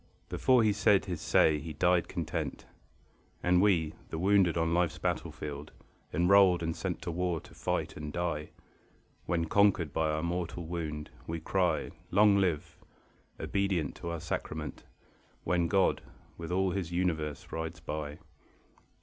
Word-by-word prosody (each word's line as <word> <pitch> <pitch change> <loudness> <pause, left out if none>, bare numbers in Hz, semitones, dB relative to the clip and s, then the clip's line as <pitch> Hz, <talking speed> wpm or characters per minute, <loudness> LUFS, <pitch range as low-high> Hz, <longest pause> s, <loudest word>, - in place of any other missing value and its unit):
Before 125 -3 +3
he 105 -1 +3
said 100 -1 +3
his 90 -4 -4
say 75 -1 +4
he 80 +2 -6
died 90 +3 +2
content. 80 -2 -4 0.8
And 90 0 +4
we, 85 -6 +3 0.2
the - - -4
wounded 95 -1 +3
on 80 0 +1
life's 85 -1 +1
battlefield, 75 0 -4 0.4
Enrolled 90 0 +5
and 80 0 -1
sent 90 -3 -4
to 85 - -3
war 90 -1 -1
to - - -16
fight - - -2
and 75 0 -6
die, 80 -2 -2 0.8
When 85 -1 +1
conquered 95 -4 +3
by 80 -1 +1
our 75 +1 -1
mortal 85 0 -3
wound, 80 -3 -4 0.2
we 85 0 -3
cry 90 0 0 0.2
"Long 100 +1 +5
live!" 90 -6 -1 0.6
obedient 95 -5 0
to 85 - -5
our 85 -1 -3
sacrament, 75 0 -5 0.6
When 85 -1 +1
God 95 +1 +2 0.3
with 85 0 -7
all 95 +1 +2
His 90 -2 -3
universe 80 -5 -2
rides 80 -1 -4
by. 75 -1 -5
85 Hz, 145 wpm, -31 LUFS, 80-90 Hz, 0.8 s, Enrolled